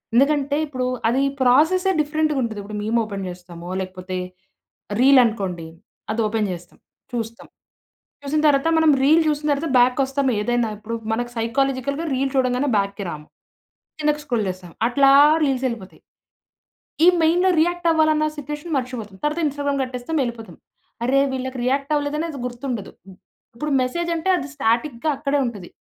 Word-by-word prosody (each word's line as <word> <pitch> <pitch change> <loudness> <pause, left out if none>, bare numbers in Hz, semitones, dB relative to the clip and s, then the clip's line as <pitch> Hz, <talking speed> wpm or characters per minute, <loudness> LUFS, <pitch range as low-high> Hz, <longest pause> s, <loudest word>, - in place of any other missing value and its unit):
ఎందుకంటే, 285 +1 +3
ఇప్పుడూ 255 -3 -3 0.2
అది 255 +4 +2 0.2
ప్రాసెస్సే 320 +10 +4
డిఫరెంటుగుంటది. 295 -7 -1
ఇప్పుడు 210 +1 -7
మీమొపెన్ 215 -3 -1
చేస్తామో, 175 -1 -10
లేకపోతే 185 0 -6 0.8
రీలనుకోండి, 225 -10 +3 0.5
అదోపెన్ 220 -1 0
చేస్తాం. 175 0 -12 0.3
చూస్తాం. 230 -1 -5 0.8
చూసిన 300 +2 0
తర్వాత 285 +2 +3
మనం 320 -1 +5
రీల్ 315 +4 +5
జూసిన 300 0 0
తర్వాత 295 +2 -3
బ్యాక్‌ 250 +1 +4
కొస్తాం. 270 +1 0
ఏదైనా 240 0 0
ఇప్పుడు 220 +2 -5 0.2
మనకి 240 +2 -2
సైకొలాజికల్‌గా 270 +5 -1
రీల్ 270 +1 0
చూడంగానే 255 +1 +1
బ్యాక్‌కి 200 0 -2
రాము. 150 -2 -8 0.7
కిందకి 300 0 0
స్క్రోల్ 240 -6 -1
చేస్తాం. 180 -1 -8 0.2
అట్లా 275 +3 +4 0.3
రీల్సెళ్ళిపోతాయి. 245 - -2 1.0
ఈ - - +7 0.2
మెయిన్‌‌లో 355 +4 +3
రియాక్టవ్వాలన్న 320 -3 +2
సిచ్యువేషన్ 295 +3 -6
మర్చిపోతాం. 240 -6 -5
తర్వాత 300 +3 0
ఇన్‌స్టాగ్రామ్ 285 -1 -1
కట్టేస్తాం, 255 +5 -4
యెళ్ళిపోతాం. 235 -2 -7 0.5
అరే! 270 +2 +3
వీళ్ళకి 260 0 -4
రియాక్టవ్వలేదనేది 290 +3 -1
గుర్తుండదు. 245 -4 -5 0.6
ఇప్పుడు 300 +4 -3
మెసేజంటే 340 +6 -2
అది 280 - -5
స్టాటిక్‌గా 245 +3 0
అక్కడే 285 0 0
ఉంటది. 205 -7 -6
260 Hz, 125 wpm, -22 LUFS, 225-295 Hz, 1.0 s, ఈ